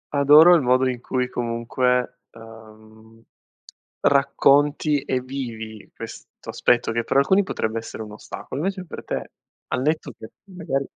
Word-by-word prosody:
Adoro 150 +5 +7
il 170 - +4
modo 130 0 +2
in 125 -2 -3
cui, 125 0 -2
comunque, 125 +1 -1
ehm, 110 0 -16 0.8
racconti, 145 +1 +3
e 130 -1 -1
vivi, 115 -5 -7
questo - - -11
aspetto, 120 -2 +1
che, 115 +1 -1
per 135 - +1
alcuni, 190 +8 +4
potrebbe 110 - -3
essere 115 0 -6
un 105 - -11
ostacolo, 105 - -8
invece 190 -1 -3
per - - -9
te, - - -5 0.4
al 125 - -2
netto 155 -1 -1
che, 110 - -11
magari 165 -8 -4
125 Hz, 140 wpm, -22 LUFS, 115-145 Hz, 0.8 s, Adoro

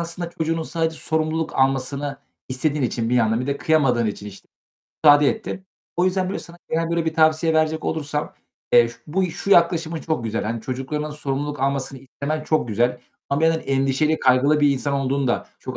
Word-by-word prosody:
aslında 170 0 -5
çocuğunun 165 0 -2
sadece 160 0 -2
sorumluluk 160 0 -1
almasını 135 +1 0 0.3
istediğin 140 +3 0
için 115 -2 -1
bir 125 - +2
yandan, 115 -1 +2
bir 125 - -3
de 140 0 -1
kıyamadığın 135 -8 +2
için, 105 0 -4
işte, 100 -1 -12 0.6
müsaade 145 -1 +7
ettin. 190 -3 -4 0.3
O 175 - +2
yüzden, 185 0 +1
böyle, - - -3
sana 170 0 -10
gelen, 165 +1 -1
böyle, 170 -1 0
bir 160 -1 -1
tavsiye 160 0 +3
verecek 160 0 +1
olursam, 150 -1 -3 0.4
eee, 120 -1 +6
ş 120 - -11
bu 185 +3 0
şu 195 - -5
yaklaşımın 170 -3 +3
çok 155 -8 -2
güzel. 115 0 -2
Hani, 115 +2 -3
çocuklarının 135 +5 -4
sorumluluk 145 -1 -3
almasını 135 -1 -1
istemen 145 +4 -5
çok 155 -6 0
güzel 120 +3 0 0.3
ama 140 +1 0
bir 160 - +4
yandan 165 0 +2
endişeli, 135 +3 +1
kaygılı 135 +4 +3
bir 145 -1 +5
insan 140 +1 -1
olduğun 135 0 0
da 120 - -1
çok 130 -1 -7
145 Hz, 190 wpm, -22 LUFS, 130-160 Hz, 0.6 s, müsaade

